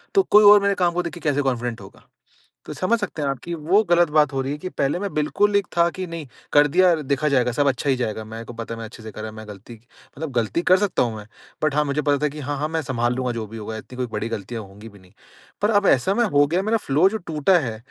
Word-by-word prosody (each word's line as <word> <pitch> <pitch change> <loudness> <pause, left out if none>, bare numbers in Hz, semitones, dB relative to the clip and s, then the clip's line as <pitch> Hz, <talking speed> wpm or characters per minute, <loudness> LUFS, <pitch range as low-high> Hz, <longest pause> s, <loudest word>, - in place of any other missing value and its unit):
तो 390 - +5
कोई 210 +1 +7
और 205 0 +7
मेरे 200 0 +1
काम 175 -2 +1
को 180 +1 -1
देख 170 - -5
के 175 - -9
कैसे 145 0 +1
कॉन्फिडेंट 120 -4 -2
होगा। 95 - -15 0.6
तो - - -7
समझ 225 +5 0
सकते 190 -6 -4
हैं 140 - 0
आप 135 - -2
की 175 - -5
वो 170 +7 +2
गलत 175 -1 +4
बात 150 -2 +4
हो 135 - 0
रही 135 +1 -3
है 145 - -3
कि 185 - -5
पहले 140 0 -1
मैं 200 0 -4
बिल्कुल 200 +7 +1
एक 200 -3 +2
था 170 0 +4
कि 185 +1 -5
नहीं 165 -3 -7 0.3
कर 145 0 +6
दिया, 180 +4 +4
देखा 145 -1 -1
जाएगा 125 -3 +2
सब 145 +4 +1
अच्छा 135 +1 0
ही 135 - +3
जाएगा 110 -3 -3
मेरे 115 +1 -8
को 120 - -9
पता 115 0 -6
है - - -7
मैं 115 - -6
अच्छे 110 0 -12
से 110 - -8
करा 110 +1 -7
है, - - -7
मैं 110 0 -10
गलती 105 +3 -11 0.4
मतलब 160 0 -5
गलती 120 +6 0
कर 185 +1 +4
सकता 205 -1 +1
हूँ 115 -2 -3
मैं। 105 - -9 0.4
बट 155 -2 +1
हाँ, 150 0 +2
मुझे 140 +1 -1
पता 145 -1 +2
था - - +3
कि 150 +2 -9
हाँ-हाँ 145 +1 -3
मैं 160 0 -1
सँभाल 120 -4 -1
लूँगा 130 -1 -1
जो 115 -2 -4
भी 115 +2 -9
होगा 110 0 -6
इतनी 125 +3 -11
कोई 125 -1 -2
बड़ी 110 +1 -3
गलतियाँ 115 +1 -5
होंगी 105 +3 -13
भी 100 -2 -17
नहीं। 90 -1 -21 0.5
पर 205 - +2
अब 205 -2 +2
ऐसा 135 +9 +3
मैं 240 - +2
हो 145 -8 +3
गया 175 +5 0
मेरा 220 +3 +1
फ्लो 155 -2 +2
जो 220 - -3
टूटा 170 -1 +1
है 115 -7 -4
145 Hz, 290 wpm, -22 LUFS, 115-175 Hz, 0.6 s, कोई